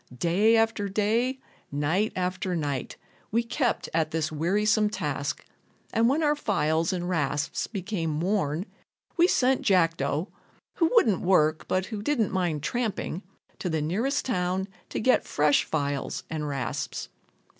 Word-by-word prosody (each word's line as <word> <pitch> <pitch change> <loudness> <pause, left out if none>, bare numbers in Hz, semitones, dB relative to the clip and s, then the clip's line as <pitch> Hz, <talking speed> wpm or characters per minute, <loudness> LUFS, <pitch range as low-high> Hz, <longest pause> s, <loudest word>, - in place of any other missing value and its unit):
Day 200 - +3
after 225 -2 +1
day, 225 +6 +1 0.3
night 160 +9 +1
after 185 +1 -1
night, 145 -5 -3 0.3
we 230 +2 +1
kept 240 +1 -1
at 160 -1 +1
this 155 -1 -1
wearisome 210 +7 +2
task, 215 - -3 0.5
and 230 +1 +4
when 300 +4 +1
our 295 0 +3
files 165 - +1
and 175 -1 -2
rasps 145 -3 -1
became 180 -7 -3
worn 175 -2 0 0.5
we 345 0 +5
sent 260 -5 +2
Jackdo 165 -3 +2 0.5
(who 330 -2 +3
wouldn't 220 - +4
work, 155 -4 +2
but 185 0 0
who 215 -1 -5
didn't 230 -3 +1
mind 175 -6 -1
tramping) 215 -4 -2 0.4
to 180 - -2
the 160 -1 0
nearest 210 - 0
town 185 -4 0 0.2
to - - -3
get 255 +3 +3
fresh 145 -1 +2
files 145 -3 -2
and 155 -2 -2
rasps. 135 -5 -3
185 Hz, 140 wpm, -27 LUFS, 155-220 Hz, 0.5 s, we